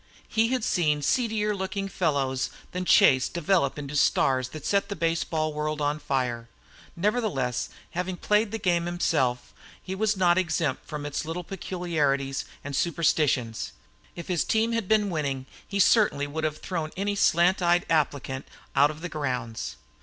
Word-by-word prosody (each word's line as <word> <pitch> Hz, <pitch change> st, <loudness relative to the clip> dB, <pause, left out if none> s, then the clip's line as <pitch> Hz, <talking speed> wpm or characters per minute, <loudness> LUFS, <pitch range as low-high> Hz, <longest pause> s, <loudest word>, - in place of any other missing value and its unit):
He 225 Hz, +1 st, +2 dB
had 255 Hz, -1 st, -1 dB
seen 150 Hz, -7 st, +1 dB
seedier 215 Hz, -, +1 dB
looking 195 Hz, +1 st, -3 dB
fellows 140 Hz, -8 st, 0 dB, 0.2 s
than 180 Hz, 0 st, -3 dB
Chase 130 Hz, -6 st, +5 dB
develop 170 Hz, -4 st, +1 dB
into 145 Hz, 0 st, -6 dB
stars 130 Hz, -3 st, +2 dB
that 155 Hz, +3 st, -9 dB
set 200 Hz, -1 st, +1 dB
the 200 Hz, -, -3 dB
baseball 160 Hz, -2 st, 0 dB
world 150 Hz, 0 st, -2 dB
afire. 135 Hz, -5 st, -1 dB, 0.5 s
Nevertheless, 185 Hz, -, 0 dB, 0.2 s
having 180 Hz, +1 st, -3 dB
played 210 Hz, +4 st, +2 dB
the 225 Hz, -, -3 dB
game 175 Hz, -4 st, +1 dB
himself, 140 Hz, -8 st, 0 dB, 0.3 s
he 190 Hz, -, -6 dB
was 210 Hz, +1 st, 0 dB
not 180 Hz, -1 st, +4 dB
exempt 160 Hz, -5 st, -1 dB
from 150 Hz, -1 st, -5 dB
its 145 Hz, -1 st, -3 dB
little 165 Hz, +3 st, -4 dB
peculiarities 155 Hz, -7 st, -1 dB, 0.2 s
and 145 Hz, -1 st, -5 dB
superstitions. 145 Hz, -8 st, +1 dB, 0.4 s
If 170 Hz, -, -7 dB
his 175 Hz, -3 st, +1 dB
team 225 Hz, +1 st, +1 dB
had 230 Hz, -4 st, -1 dB
been 210 Hz, -2 st, +2 dB
winning 140 Hz, -5 st, -2 dB, 0.2 s
he 200 Hz, -, -3 dB
certainly 195 Hz, -8 st, +4 dB
would 155 Hz, +2 st, -3 dB
have 155 Hz, 0 st, -2 dB
thrown 165 Hz, -3 st, -3 dB
any 200 Hz, +1 st, 0 dB
slant 180 Hz, -1 st, +3 dB
eyed 175 Hz, 0 st, +3 dB
applicant 140 Hz, -4 st, 0 dB, 0.3 s
out 140 Hz, +1 st, +6 dB
of 155 Hz, +1 st, -8 dB
the 175 Hz, -, -4 dB
grounds. 125 Hz, -, -3 dB
165 Hz, 155 wpm, -26 LUFS, 145-190 Hz, 0.5 s, out